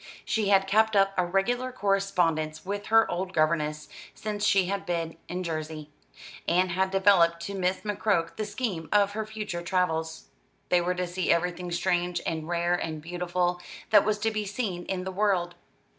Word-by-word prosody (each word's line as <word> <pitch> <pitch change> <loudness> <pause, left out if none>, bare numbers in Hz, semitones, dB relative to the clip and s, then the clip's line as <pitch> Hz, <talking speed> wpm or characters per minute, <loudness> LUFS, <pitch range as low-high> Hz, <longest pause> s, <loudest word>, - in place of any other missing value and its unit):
She 215 -3 0
had 195 -1 +5
kept 215 +2 +3
up 195 0 +4
a 180 - +2
regular 240 +8 0
correspondence 180 -8 0
with 205 +1 -4
her 225 0 +5
old 180 +2 -3
governess, 155 -2 0 0.3
since 210 -1 -4
she 195 -3 +4
had 195 +2 -2
been 165 -2 -2
in 180 +1 -4
Jersey, 155 -2 -5 0.6
and 180 +1 +2
had 190 +2 +1
developed 190 -3 +4
to 200 - -5
Miss 185 -1 -1
McCroke 200 -5 0
the 215 - -3
scheme 200 - -3
of 205 -1 +4
her 215 +1 -4
future 215 -5 -5
travels. 165 -3 -1 0.4
They 180 -1 +4
were 180 +1 -1
to 180 0 -1
see 180 +1 -1
everything 175 +1 0
strange 175 0 0
and 160 -1 -3
rare 175 0 0
and 160 -3 -2
beautiful, 175 +2 -2 0.3
that - - +7
was 215 0 +1
to 225 0 +1
be 215 -1 -2
seen 200 -4 -3
in 185 -1 -3
the 190 - -4
world. 185 -3 +1
180 Hz, 175 wpm, -27 LUFS, 170-200 Hz, 0.6 s, that